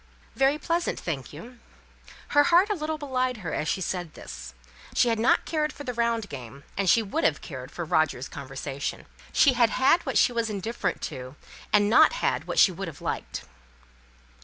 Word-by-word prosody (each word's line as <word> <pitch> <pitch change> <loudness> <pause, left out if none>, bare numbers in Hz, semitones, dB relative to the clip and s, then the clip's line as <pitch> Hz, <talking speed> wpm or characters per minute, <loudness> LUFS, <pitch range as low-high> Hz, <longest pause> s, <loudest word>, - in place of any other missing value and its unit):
"Very 270 +2 +3
pleasant, 335 +3 -1
thank 140 -7 -4
you." 230 +11 -11 0.7
Her 290 0 +5
heart 355 +5 +5
a - - +3
little 315 -3 -3
belied 255 -4 -1
her - - -3
as 155 - -2
she 190 - 0
said 175 -3 -3
this. - - -9 0.4
She 245 - +4
had 225 -1 0
not 230 - +3
cared 305 -2 0
for 290 - -9
the 250 -3 -4
round 230 -2 0
game; 135 - -9
and 195 -2 +1
she 225 +7 +5
would 200 - -2
have 145 - +2
cared 130 -3 -8
for 170 +2 -5
Roger's 155 -4 +1
conversation. 140 +1 -5 0.3
She 280 - +5
had 235 -2 +4
had 265 +9 +3
what - - -1
she - - +5
was 230 -1 0
indifferent 215 +3 -3
to, 130 0 -8 0.4
and 205 0 +4
not 225 - +6
had - - -1
what - - -4
she 190 - +7
would 190 +2 -5
have 155 -3 -9
liked. - - -4
225 Hz, 190 wpm, -26 LUFS, -, 0.7 s, she